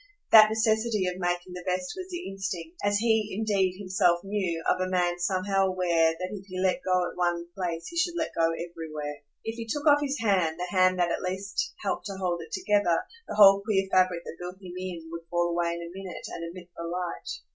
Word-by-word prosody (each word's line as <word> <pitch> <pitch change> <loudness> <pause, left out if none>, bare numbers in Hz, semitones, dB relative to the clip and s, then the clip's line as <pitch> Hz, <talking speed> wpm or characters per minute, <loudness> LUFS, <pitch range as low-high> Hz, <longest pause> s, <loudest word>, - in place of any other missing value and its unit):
That 215 -1 +10
necessity 220 -1 +1
of 180 0 -3
making 175 0 -2
the 180 - -6
best 180 0 -2
was 370 0 -7
the 355 -1 -5
instinct 190 -3 -5
as 205 0 +3
he 220 -2 +1
indeed 195 -4 +1
himself 185 -3 +2
knew 190 -5 -2
of - - +2
a 185 - 0
man 175 -1 +1
somehow 195 +2 +1
aware 170 -3 +2
that 185 +1 -4
if 200 -2 -8
he 185 -1 -5
let 190 +7 +1
go 185 -1 +2
at - - -15
one 175 -1 0
place 170 -3 -3
he 340 - -7
should 345 +1 +1
let 320 - -2
go 165 0 +3
everywhere. 160 -3 -5 0.2
If 225 +1 -4
he 230 -1 -5
took 295 +6 -3
off 290 -1 +6
his 285 0 -1
hand, 185 -7 +1
the 180 +2 -4
hand 185 0 +4
that 175 -1 +2
at - - -1
least 195 - -3
helped - - -2
to 195 -1 -6
hold 175 -2 -1
it 160 -1 -11
together, 205 -4 +2 0.3
the - - -5
whole 200 -1 +8
queer 200 -2 +1
fabric 185 -2 +3
that - - -8
built 180 +1 -6
him 185 -2 -9
in 180 -3 -6
would 170 0 -7
fall 175 0 +1
away 170 0 0
in 170 - -6
a 170 +1 -8
minute 190 -1 -7
and 170 - -5
admit 175 +1 -10
the - - -7
light. 175 +1 -4
185 Hz, 225 wpm, -27 LUFS, 175-205 Hz, 0.3 s, That